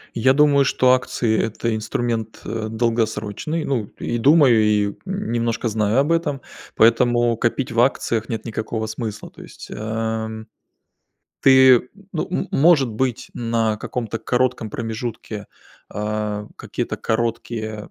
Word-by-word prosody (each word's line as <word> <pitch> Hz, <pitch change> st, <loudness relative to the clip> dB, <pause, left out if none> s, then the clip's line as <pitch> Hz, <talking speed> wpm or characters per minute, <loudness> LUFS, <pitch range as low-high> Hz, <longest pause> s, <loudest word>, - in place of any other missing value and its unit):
Я 130 Hz, +3 st, +4 dB
думаю, 145 Hz, -1 st, +5 dB
что 130 Hz, -1 st, +3 dB
акции- 120 Hz, -3 st, 0 dB
это 115 Hz, +1 st, -2 dB
инструмент, 115 Hz, 0 st, -3 dB
э, 110 Hz, 0 st, -3 dB
долгосрочный. 115 Hz, +6 st, -1 dB
Ну, 125 Hz, -6 st, -1 dB
и 120 Hz, -, -2 dB
думаю, 135 Hz, -3 st, +5 dB
и 105 Hz, -1 st, +2 dB
немножко 120 Hz, -, -2 dB
знаю 105 Hz, +1 st, 0 dB
об 145 Hz, +4 st, +1 dB
этом, 150 Hz, -5 st, 0 dB, 0.3 s
поэтому 120 Hz, +1 st, +4 dB
копить 120 Hz, +3 st, -1 dB
в 115 Hz, -, -1 dB
акциях 120 Hz, -3 st, 0 dB
нет 115 Hz, -, -4 dB
никакого 110 Hz, 0 st, -3 dB
смысла. 110 Hz, -1 st, -6 dB
То -, -, -14 dB
есть, -, -, -12 dB
эм, 110 Hz, 0 st, -4 dB, 0.9 s
ты, 130 Hz, -2 st, +6 dB, 0.2 s
ну, 165 Hz, -, -2 dB
м 185 Hz, -, -2 dB
может 145 Hz, -4 st, +4 dB
быть, 120 Hz, +2 st, -2 dB
на 115 Hz, -2 st, 0 dB
каком-то 115 Hz, 0 st, -4 dB
коротком 125 Hz, -1 st, 0 dB
промежутке, 110 Hz, -2 st, -5 dB, 0.5 s
э, 105 Hz, 0 st, -3 dB
какие-то -, -, -4 dB
короткие 110 Hz, -2 st, -3 dB
115 Hz, 125 wpm, -21 LUFS, 110-130 Hz, 0.9 s, ты